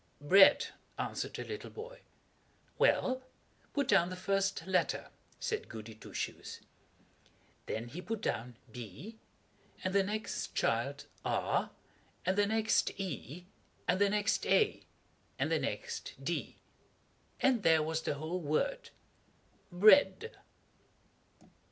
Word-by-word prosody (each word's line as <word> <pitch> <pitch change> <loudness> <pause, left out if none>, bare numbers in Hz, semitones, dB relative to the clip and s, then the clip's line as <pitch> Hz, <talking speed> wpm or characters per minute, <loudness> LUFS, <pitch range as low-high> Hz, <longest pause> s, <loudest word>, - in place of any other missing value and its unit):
"Bread," 190 +7 +6 0.3
answered - - -3
the - - -4
little 425 - -6
boy. 485 +3 -9 0.8
"Well, 260 0 +3 0.5
put 280 -3 0
down 175 -9 +4
the 185 - -5
first 195 -2 0
letter," 185 -1 0 0.3
said 440 - -3
Goody 110 -1 -8
Two 110 - -13
Shoes. - - -5 1.1
Then 115 +2 -3
he 170 +8 -7
put 220 +4 -3
down 120 - -3
B, 125 - -9 0.6
and 185 - -1
the 200 - +5
next 215 +3 -3
child - - 0 0.2
R, - - 0 0.6
and 185 - +2
the 205 0 +3
next 220 -2 +1
E, 180 -2 -5 0.4
and 185 +2 +2
the 200 - +5
next 205 0 +1
A, 430 -2 +3 0.6
and - - 0
the - - +3
next 470 -2 -4
D, - - -2 0.8
and 255 -4 +3
there 160 -4 +5
was 160 +1 -1
the 145 - -2
whole 160 +5 -3
word 470 - -1 0.8
BREAD. 215 - +6
195 Hz, 120 wpm, -33 LUFS, 160-225 Hz, 1.1 s, Bread